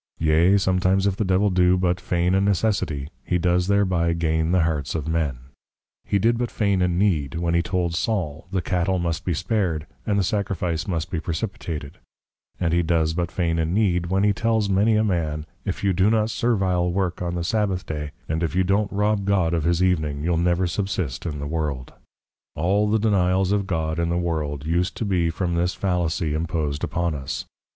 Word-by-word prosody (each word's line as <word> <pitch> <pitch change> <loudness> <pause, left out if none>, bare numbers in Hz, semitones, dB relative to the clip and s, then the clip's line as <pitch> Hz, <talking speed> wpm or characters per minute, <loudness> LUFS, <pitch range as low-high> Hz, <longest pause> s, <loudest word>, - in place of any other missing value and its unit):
Yea, 80 +5 +4
sometimes 95 0 +2
if 100 -2 +1
the 105 - -1
Devil 95 +1 +2
do 90 0 +4
but 90 -1 0
Feign 90 +1 0
a 95 - +3
Necessity, 95 -8 0
he 90 - 0
does 90 +1 +1
thereby 95 -4 +2
Gain 80 0 0
the 90 -2 +3
Hearts 75 -3 -1
of 80 -2 -3
Men; 80 -5 0 0.7
he 100 - +1
did 115 +4 +2
but 120 -1 -1
feign 100 -3 +1
a 90 - +3
Need, 85 -6 +1
when 85 0 -1
he 85 - +3
told 90 -2 -1
Saul, 85 -5 -2
the 95 -2 -1
Cattel 90 +1 0
must 85 -2 -2
be 90 - 0
spared, 90 -4 -1 0.2
and 100 - +2
the 100 - +2
sacrifice 90 -4 -1
must 85 -1 -2
be 85 - -1
precipitated, 80 -3 -5 0.3
& 85 -2 -5
he 85 +1 +3
does 80 -1 +1
but 85 0 -2
feign 85 -2 0
a - - +2
Need, 90 -1 +1
when 95 +2 +1
he 105 0 +4
tells 110 -1 0
many 105 +3 +3
a 110 - +3
man, 80 -7 -1 0.2
_if - - -3
you 100 -1 +2
do 95 +4 +3
no 110 -1 +3
servile 95 -6 +1
work 90 -1 -1
on 85 -1 -2
the 85 - -2
+Sabbath 95 -1 0
day+, 75 -1 -4 0.2
and 80 +1 -1
if 85 +1 -1
you 95 - +3
don't 100 +2 +1
Rob 105 0 +1
God 95 -4 +2
of 80 -2 0
his 85 +1 +2
evening, 75 -6 0
you'll 85 +1 +1
never 85 +2 +2
subsist 90 -7 -2
in 75 -3 -4
the 70 - -5
world._ 75 -4 -3 0.6
All 100 +6 +1
the 110 - +3
denials 95 -3 +2
of 100 -1 0
God, 80 -2 -1
in 85 0 0
the 85 - 0
world, 75 -5 -2
use 85 +3 +1
to 115 - -5
be 90 -4 +1
from 85 +1 -2
this 85 +2 0
Fallacy 85 -4 -1
impos'd 80 -2 -2
upon 85 -1 -1
us. 70 -2 -4
90 Hz, 205 wpm, -23 LUFS, 80-95 Hz, 0.7 s, Yea